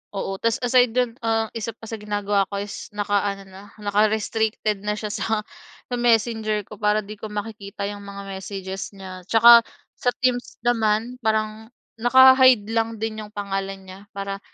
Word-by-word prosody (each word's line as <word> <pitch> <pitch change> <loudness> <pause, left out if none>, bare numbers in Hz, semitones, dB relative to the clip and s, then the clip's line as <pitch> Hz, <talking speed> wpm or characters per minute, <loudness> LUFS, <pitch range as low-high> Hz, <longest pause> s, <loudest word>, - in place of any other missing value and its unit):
Oo, 195 0 -3
ta's 230 -1 +1
aside 245 -1 +3
do'n, 245 -2 0
ah, 225 -1 0
isa 230 -1 -5
pa - - -29
sa 225 0 -6
ginagawa 205 -1 0
ko 200 0 -4
is, 205 - -8
naka-ano 205 -1 -1
na, 190 0 -13
naka-restricted 215 0 0
na 210 +1 -2
siya 210 -1 -5
sa, 220 0 -1 0.5
sa - - 0
messenger 225 -2 +1
ko - - -13
para 210 0 +2
'di 210 +1 -10
ko 220 - -6
makikita 210 -1 -6
yung 205 -1 -9
mga 200 0 -8
messages 195 0 -6
niya, 185 -2 -10
tsaka 235 +2 +8 0.4
sa - - -5 0.2
Teams 245 -1 0
naman, 230 +1 +1
parang 220 -1 -1 0.3
naka-hide 255 -2 +6
lang 225 0 0
din 220 0 -4
yung 210 -1 -9
pangalan 195 -1 -4
niya 190 0 -11 0.2
para 195 0 -4
215 Hz, 165 wpm, -23 LUFS, 200-225 Hz, 0.5 s, tsaka